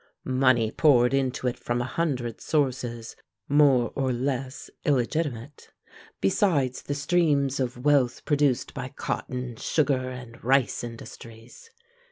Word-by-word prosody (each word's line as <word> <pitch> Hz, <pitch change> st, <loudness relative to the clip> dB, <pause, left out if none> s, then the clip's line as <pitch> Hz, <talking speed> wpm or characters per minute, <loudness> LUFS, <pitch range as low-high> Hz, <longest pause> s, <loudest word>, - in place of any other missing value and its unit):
Money 130 Hz, -4 st, +2 dB
poured 125 Hz, -5 st, +4 dB
into 130 Hz, -2 st, 0 dB
it 125 Hz, -, -2 dB
from 120 Hz, 0 st, -2 dB
a -, -, 0 dB
hundred 125 Hz, -4 st, -2 dB
sources 125 Hz, -6 st, -2 dB, 0.3 s
more 140 Hz, -5 st, +4 dB
or 135 Hz, -2 st, 0 dB
less 130 Hz, +2 st, -3 dB, 0.2 s
illegitimate, 140 Hz, -1 st, -1 dB, 0.5 s
besides 130 Hz, -, +1 dB
the 145 Hz, -, -4 dB
streams 140 Hz, -3 st, +1 dB
of 125 Hz, 0 st, -3 dB
wealth 140 Hz, -4 st, +2 dB
produced 145 Hz, -4 st, +1 dB
by -, -, -5 dB
cotton, 125 Hz, -1 st, -4 dB
sugar, 135 Hz, -3 st, 0 dB
and 125 Hz, -2 st, -10 dB
rice 130 Hz, 0 st, +2 dB
industries. 115 Hz, -, -11 dB
130 Hz, 120 wpm, -26 LUFS, 120-145 Hz, 0.5 s, poured